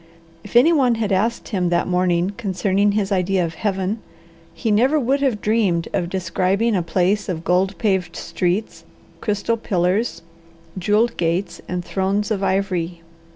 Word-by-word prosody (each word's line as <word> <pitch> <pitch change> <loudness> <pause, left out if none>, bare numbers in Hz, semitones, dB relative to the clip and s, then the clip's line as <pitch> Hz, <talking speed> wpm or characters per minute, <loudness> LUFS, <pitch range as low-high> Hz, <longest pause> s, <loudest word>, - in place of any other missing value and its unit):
If 205 - -12
anyone 260 -2 +5
had 220 -2 -2
asked 215 +5 0
him 185 -5 0
that 175 0 +1
morning 180 0 +1
concerning 200 -1 +1
his 205 -1 -1
idea 185 -1 +1
of 165 - -5
Heaven, 195 +3 -2 0.5
he 225 - -2
never 255 +9 +3
would 275 +2 +1
have 255 -7 0
dreamed 205 -6 +1
of 170 - -1
describing 190 +4 0
a 180 - +2
place 190 +4 0
of 165 -3 -3
gold 185 +3 +1
paved 190 -5 0
streets, 185 +4 -2 0.4
crystal 210 +2 -1
pillars, 185 -1 0 0.5
jewelled 210 +5 +1
gates, 170 +2 -1
and 180 -1 -3
thrones 200 +2 -1
of 200 -3 0
ivory. 185 -3 -1
195 Hz, 150 wpm, -21 LUFS, 180-215 Hz, 0.5 s, anyone